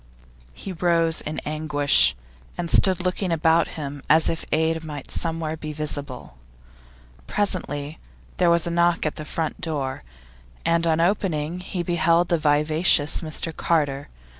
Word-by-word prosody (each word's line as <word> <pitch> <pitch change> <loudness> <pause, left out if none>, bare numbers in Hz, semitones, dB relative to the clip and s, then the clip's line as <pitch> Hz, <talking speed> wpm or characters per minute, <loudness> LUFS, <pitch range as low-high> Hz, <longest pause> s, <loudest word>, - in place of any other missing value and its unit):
He 195 - -7
rose 165 -1 +1
in 155 - -5
anguish, 145 - +3 0.4
and 170 -1 -3
stood 185 -2 +3
looking 180 0 -1
about 165 0 +3
him 145 -2 -6
as 160 +1 +5
if 165 - -3
aid 160 +1 +1
might 150 -3 -7
somewhere 165 -2 -2
be 155 -1 -7
visible. 140 - -3 0.9
Presently 150 -7 -2 0.4
there 180 -2 +3
was 170 -1 +3
a 170 - -2
knock 170 -1 +2
at 155 - -2
the 155 - -6
front 160 0 -3
door, 145 -5 -3 0.6
and 170 0 +2
on 160 0 +2
opening 175 -3 0
he 180 -1 -4
beheld 170 0 +2
the 170 - +2
vivacious 150 +1 +3
Mr 160 0 -3
Carter. 145 -4 0
160 Hz, 140 wpm, -23 LUFS, 150-170 Hz, 0.9 s, as